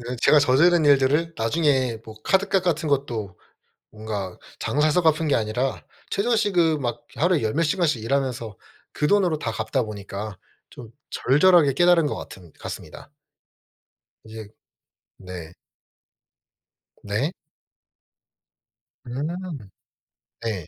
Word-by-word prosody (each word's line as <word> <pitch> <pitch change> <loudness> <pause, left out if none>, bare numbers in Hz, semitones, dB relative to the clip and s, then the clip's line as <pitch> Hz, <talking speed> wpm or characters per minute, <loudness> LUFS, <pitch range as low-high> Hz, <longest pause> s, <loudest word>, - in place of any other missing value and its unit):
이게 120 +1 -5
제가 150 - +6
저지른 155 +5 +4
일들을 145 +4 +3
나중에 130 -1 +1
뭐 110 - -10
카드값 195 -1 +2
같은 160 -2 0
것도 115 -10 -2 0.5
뭔가 105 -4 -6 0.2
장사해서 155 +4 +2
갚은 160 0 +2
게 - - +3
아니라 115 +5 -1 0.3
최저 230 +3 +1
시급 175 -8 +2
막 120 -2 -3
하루에 170 -2 +2
열 110 - 0
몇 165 - +2
시간씩 155 - 0
일하면서 125 -5 -2 0.4
그 150 - 0
돈으로 180 -6 +2
다 115 - -3
갚다 110 +3 -1
보니까 100 -1 -7 0.3
좀 115 -3 -11 0.2
절절하게 150 +1 +4
깨달은 175 +1 +4
것 - - -2
같은 90 -4 -11
같습니다. - - -9 1.2
이제 110 -1 -9 0.7
네. 90 -3 -9 1.5
네. 120 - -2 1.7
음. 125 +4 -4 1.2
네. 100 -8 -3
135 Hz, 235 characters per minute, -24 LUFS, 110-165 Hz, 1.7 s, 제가